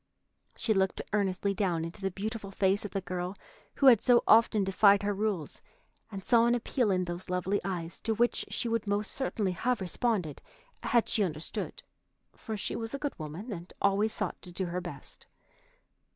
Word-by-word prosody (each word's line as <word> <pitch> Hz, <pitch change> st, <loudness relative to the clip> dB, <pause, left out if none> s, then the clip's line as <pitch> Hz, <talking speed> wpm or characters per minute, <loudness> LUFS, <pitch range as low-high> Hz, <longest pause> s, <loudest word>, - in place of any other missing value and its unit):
She 220 Hz, -, +1 dB
looked 190 Hz, -1 st, 0 dB
earnestly 200 Hz, -1 st, +1 dB
down 175 Hz, -5 st, 0 dB
into 165 Hz, +4 st, -8 dB
the 195 Hz, -, 0 dB
beautiful 205 Hz, +2 st, -5 dB
face 195 Hz, +1 st, +1 dB
of -, -, -4 dB
the 195 Hz, -, -3 dB
girl 180 Hz, +1 st, -4 dB, 0.4 s
who 275 Hz, -, +1 dB
had 240 Hz, -5 st, +8 dB
so 245 Hz, -1 st, +5 dB
often 220 Hz, -2 st, +5 dB
defied 200 Hz, +1 st, +5 dB
her 205 Hz, 0 st, +1 dB
rules, 200 Hz, -5 st, -2 dB, 0.5 s
and 195 Hz, -2 st, -6 dB
saw 235 Hz, -1 st, +4 dB
an 240 Hz, -, +3 dB
appeal 240 Hz, -1 st, 0 dB
in 185 Hz, -2 st, +1 dB
those 175 Hz, +2 st, -6 dB
lovely 180 Hz, +2 st, 0 dB
eyes 175 Hz, -3 st, -4 dB
to 220 Hz, 0 st, -1 dB
which 240 Hz, +2 st, +2 dB
she -, -, -2 dB
would 230 Hz, -2 st, -1 dB
most 205 Hz, +1 st, +1 dB
certainly 220 Hz, -7 st, -1 dB
have 240 Hz, +7 st, 0 dB
responded 190 Hz, -, -1 dB, 0.4 s
had 235 Hz, -2 st, +2 dB
she 215 Hz, -, +2 dB
understood, 155 Hz, -4 st, -4 dB, 0.5 s
for 220 Hz, -2 st, -5 dB
she -, -, -3 dB
was 225 Hz, +3 st, -4 dB
a -, -, -2 dB
good 285 Hz, 0 st, -3 dB
woman 165 Hz, +10 st, -6 dB
and 175 Hz, -1 st, -9 dB
always 200 Hz, +2 st, +2 dB
sought -, -, -2 dB
to 180 Hz, -, -10 dB
do 185 Hz, +2 st, -2 dB
her 180 Hz, +1 st, -3 dB
best. -, -, -9 dB
200 Hz, 185 wpm, -30 LUFS, 180-220 Hz, 0.5 s, had